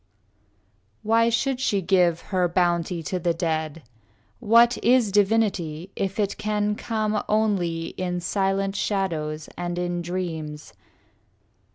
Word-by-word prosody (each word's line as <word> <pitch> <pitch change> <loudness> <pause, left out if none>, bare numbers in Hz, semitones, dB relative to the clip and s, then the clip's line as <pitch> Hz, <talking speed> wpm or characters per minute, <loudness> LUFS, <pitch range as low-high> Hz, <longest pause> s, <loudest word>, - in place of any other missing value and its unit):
II 100 +1 -41 0.3
Why 230 +2 +3
should 250 +3 0
she 210 -6 +1
give 180 -2 +2
her 185 -2 0
bounty 175 -1 0
to 185 +4 -3
the 170 -1 0
dead? 160 -2 -2 0.6
What 235 +1 +4
is 240 -3 +4
divinity 195 -5 +1
if 195 +1 -3
it 200 -2 -1
can 210 0 0
come 215 -1 -1
Only 185 -7 0
in 180 -1 -3
silent 195 +1 -1
shadows 160 -7 -2
and 175 0 -4
in 175 0 -2
dreams? 165 -4 -5
180 Hz, 125 wpm, -24 LUFS, 165-210 Hz, 0.6 s, What